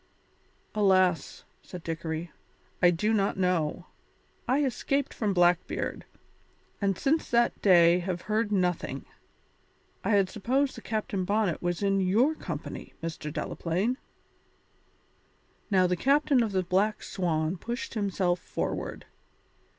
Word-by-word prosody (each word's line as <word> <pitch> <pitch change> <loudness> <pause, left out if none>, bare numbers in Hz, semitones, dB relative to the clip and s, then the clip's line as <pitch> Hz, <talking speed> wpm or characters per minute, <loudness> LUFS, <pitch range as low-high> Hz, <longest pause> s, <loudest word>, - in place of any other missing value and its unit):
"Alas!" 185 -4 +2 0.2
said 180 -2 -10
Dickory, 165 0 -4 0.5
"I 175 - +7
do 195 +6 +1
not 200 -3 +1
know. 180 -2 0 0.6
I 270 +4 +2
escaped 275 +2 -1
from 215 -3 -1
Blackbeard, 175 -1 +1 0.8
and 195 -2 +1
since 315 +4 +1
that 235 0 +2
day 175 -2 +6
have 180 -1 -3
heard 215 0 -1
nothing. 180 -4 -1 1.0
I - - -1
had 195 -2 +4
supposed 260 +8 0
that - - -11
Captain 210 -3 -2
Bonnet 200 -3 0
was 175 +2 -2
in 195 -1 +2
your 220 +11 +3
company, - - -7
Mr. 160 -2 -4
Delaplaine." 175 - -1 1.7
Now 190 -3 +4
the 180 0 +1
captain 280 - +3
of 225 -3 0
the 190 -1 +1
Black 195 +4 +1
Swan 165 -3 -1
pushed 235 +5 -5
himself 190 -4 0
forward. - - -4
190 Hz, 120 wpm, -28 LUFS, 175-220 Hz, 1.7 s, I